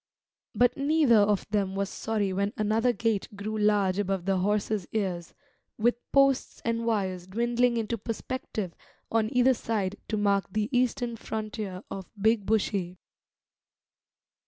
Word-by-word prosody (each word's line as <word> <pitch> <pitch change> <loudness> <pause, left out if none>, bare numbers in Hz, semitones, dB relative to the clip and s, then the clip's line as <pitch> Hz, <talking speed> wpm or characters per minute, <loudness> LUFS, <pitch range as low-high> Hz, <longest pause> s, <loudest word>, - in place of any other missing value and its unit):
But 245 +3 +4
neither 280 -5 +4
of 205 -1 +2
them 195 -2 0
was 200 0 0
sorry 205 -2 -2
when 200 +3 0
another 220 +3 +2
gate 225 -4 -1
grew 210 +2 -4
large 205 -3 +2
above 195 -3 -1
the 195 -1 +2
horses' 205 0 0
ears, 185 -6 -2 0.4
with 240 +2 +2
posts 275 -1 +3
and 230 0 -1
wires 190 -5 -1
dwindling 235 +4 +1
into 230 0 -2
perspective 220 -4 -4 0.4
on 225 -1 +2
either 250 +1 +4
side 205 -5 -2
to 215 - -1
mark 200 -2 +2
the 215 +5 -1
eastern 245 -1 0
frontier 215 -4 -5
of 190 -2 -6
Big 215 -1 +2
Bushy. 195 -4 0
215 Hz, 135 wpm, -28 LUFS, 195-230 Hz, 0.4 s, But